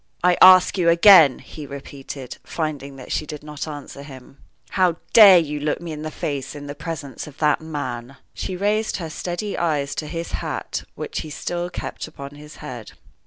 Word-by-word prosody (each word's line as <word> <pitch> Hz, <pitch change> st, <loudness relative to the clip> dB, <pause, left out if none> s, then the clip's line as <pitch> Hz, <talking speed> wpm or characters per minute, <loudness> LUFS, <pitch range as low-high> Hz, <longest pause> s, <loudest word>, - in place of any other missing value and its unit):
"I 180 Hz, 0 st, +5 dB
ask 185 Hz, +1 st, +8 dB
you 170 Hz, -1 st, +4 dB
again," 170 Hz, -5 st, +7 dB
he 150 Hz, -2 st, -10 dB
repeated, 135 Hz, -1 st, -9 dB
finding 145 Hz, -4 st, -4 dB
that 130 Hz, -2 st, -10 dB
she 155 Hz, -, -2 dB
did 150 Hz, 0 st, -8 dB
not 150 Hz, 0 st, -6 dB
answer 145 Hz, -2 st, -8 dB
him, 135 Hz, -1 st, -13 dB, 0.3 s
"how 185 Hz, -3 st, +2 dB, 0.2 s
dare 200 Hz, -5 st, +10 dB
you 150 Hz, -3 st, -1 dB
look 150 Hz, +1 st, -1 dB
me 170 Hz, -1 st, -7 dB
in 150 Hz, -1 st, -6 dB
the 155 Hz, -, -4 dB
face 145 Hz, -3 st, -4 dB
in 145 Hz, 0 st, -8 dB
the 145 Hz, -, -6 dB
presence 145 Hz, -2 st, -6 dB
of 150 Hz, -1 st, -13 dB
that 150 Hz, -1 st, +2 dB
man?" 135 Hz, -5 st, -6 dB, 0.2 s
She 185 Hz, -, -4 dB
raised 210 Hz, +3 st, 0 dB
her 165 Hz, -3 st, -6 dB
steady 180 Hz, +6 st, -4 dB
eyes 150 Hz, -5 st, 0 dB
to 155 Hz, -, -4 dB
his 165 Hz, +2 st, -5 dB
hat, -, -, -4 dB
which -, -, -5 dB
he 155 Hz, -, -6 dB
still 175 Hz, +3 st, -4 dB
kept -, -, -6 dB
on 140 Hz, 0 st, -7 dB
his 150 Hz, +1 st, -13 dB
head. 120 Hz, -6 st, -8 dB
150 Hz, 190 wpm, -22 LUFS, 140-170 Hz, 0.3 s, dare